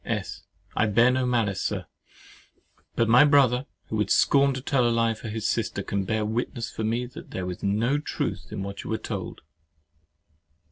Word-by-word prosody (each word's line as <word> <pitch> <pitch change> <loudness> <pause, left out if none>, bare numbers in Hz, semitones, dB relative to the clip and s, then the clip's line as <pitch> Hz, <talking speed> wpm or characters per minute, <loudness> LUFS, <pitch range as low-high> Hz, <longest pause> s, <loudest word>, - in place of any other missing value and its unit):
S. - - -4 0.3
I 105 - +2
bear 115 +4 +4
no 130 0 0
malice, 115 -6 0
Sir; - - -2 1.1
but 115 - +2
my 120 +5 +7
brother, 135 -3 +4 0.2
who 110 - -2
would 105 - 0
scorn 140 0 +4
to - - -3
tell 135 -1 +1
a 120 - +3
lie 115 -1 +2
for 110 - -9
his 110 -1 -2
sister, - - -1
can 100 -1 -2
bear 110 +1 0
witness 115 +1 -3
for 110 - -5
me 115 +3 0
that 125 - -11
there 95 - -4
was 90 -1 -5
no 115 +8 +1
truth 150 - -3
in 95 - -4
what 100 0 -6
you - - -8
were 110 - 0
told. - - -6
115 Hz, 190 wpm, -26 LUFS, 105-125 Hz, 1.1 s, my